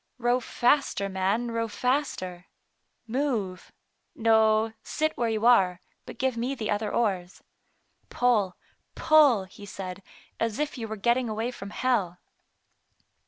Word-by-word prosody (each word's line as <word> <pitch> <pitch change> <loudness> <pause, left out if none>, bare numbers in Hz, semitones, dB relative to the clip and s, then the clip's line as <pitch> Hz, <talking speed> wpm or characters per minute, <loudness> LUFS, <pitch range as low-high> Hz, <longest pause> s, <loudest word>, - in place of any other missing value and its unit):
" - - -49
Row 245 0 +2
faster, 245 -4 +1
man, 195 +5 0
row 230 0 -1
faster. 210 -8 -2 0.6
Move 225 -7 -2 0.2
— - - -49
no, 220 -1 +3
sit 310 0 -1
where 235 -1 0
you 220 0 -1
are, 190 -7 +5 0.3
but - - -9
give 265 -2 0
me 245 +4 -2
the 220 -4 -3
other 210 0 -1
oars. 190 -6 -1 0.7
Pull, 220 -7 +1 0.4
pull,*' 290 -10 +5
he 190 +2 -14
said, 190 -1 -7 0.2
" - - -25
as 225 -2 -1
if 300 0 -2
you 230 -4 -5
were 220 - -4
getting 235 +3 +1
away 220 +3 -2
from 200 -5 -8
hell." 205 -7 0
225 Hz, 145 wpm, -27 LUFS, 200-245 Hz, 0.7 s, are